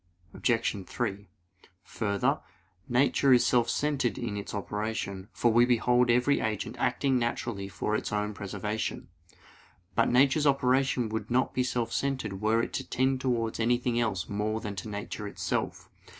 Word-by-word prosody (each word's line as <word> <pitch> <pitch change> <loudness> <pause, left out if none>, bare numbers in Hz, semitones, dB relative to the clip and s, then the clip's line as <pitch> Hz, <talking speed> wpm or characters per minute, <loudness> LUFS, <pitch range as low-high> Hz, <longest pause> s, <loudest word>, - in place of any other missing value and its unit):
Obj. 115 -4 0
3: 100 -4 -3 0.6
Further, 100 -3 0 0.5
nature 135 +2 +4
is 125 - +5
self 120 -2 +3
centered 140 -4 0
in 115 -4 -3
its 100 +1 -5
operation; 105 -1 -4
for 120 -2 +2
we 120 +1 +6
behold 125 0 +3
every 125 +4 +3
agent 110 -2 -2
acting 135 -2 +1
naturally 115 -4 -2
for 105 +2 -2
its - - -2
own 105 0 -1
preservation. 105 +2 -4 0.8
But - - +3
nature's 135 +4 +4
operation 130 -2 +2
would 110 +1 -4
not 125 +2 +1
be 130 - +1
self 120 -2 -1
centered 120 -8 -2
were 110 +2 +2
it - - -5
to - - -2
tend 130 0 +1
towards 115 -4 -1
anything 120 +1 +1
else 100 -7 -1
more 105 +2 -1
than 105 -2 -5
to 110 - -5
nature 105 0 -5
itself. 100 - -3
115 Hz, 150 wpm, -29 LUFS, 105-125 Hz, 0.8 s, we